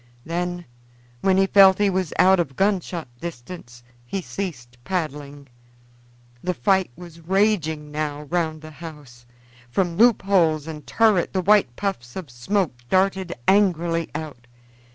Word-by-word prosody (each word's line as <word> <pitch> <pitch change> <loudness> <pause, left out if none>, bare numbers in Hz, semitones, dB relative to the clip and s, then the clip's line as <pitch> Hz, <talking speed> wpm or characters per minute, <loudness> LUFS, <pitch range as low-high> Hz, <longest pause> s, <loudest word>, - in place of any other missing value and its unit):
Then, 175 +1 -3 0.5
when 190 +7 +2
he 195 - +4
felt 195 -1 +6
he 205 -1 +2
was 185 -4 -1
out 190 0 +5
of 140 -6 -2
gunshot 185 -4 -1
distance, 125 -5 -9 0.2
he 155 +11 -4
ceased 130 -11 -6
paddling. 145 -4 -4 0.9
The 180 0 -2
fight 190 -1 +2
was 170 -2 -12
raging 165 -5 0
now 150 -1 -3
around 160 0 -2
the 155 - -9
house; 145 -7 -12 0.4
from 175 +4 -1
loop 235 -1 +5
holes 165 -6 +2
and 155 -2 -8
turret 215 -6 +2
the 190 - +1
white 200 -10 +3
puffs 180 -12 -4
of 170 -9 -7
smoke 160 - -1 0.2
darted 190 0 +1
angrily 170 -4 +2
out. 150 -6 -7
170 Hz, 135 wpm, -23 LUFS, 150-190 Hz, 0.9 s, felt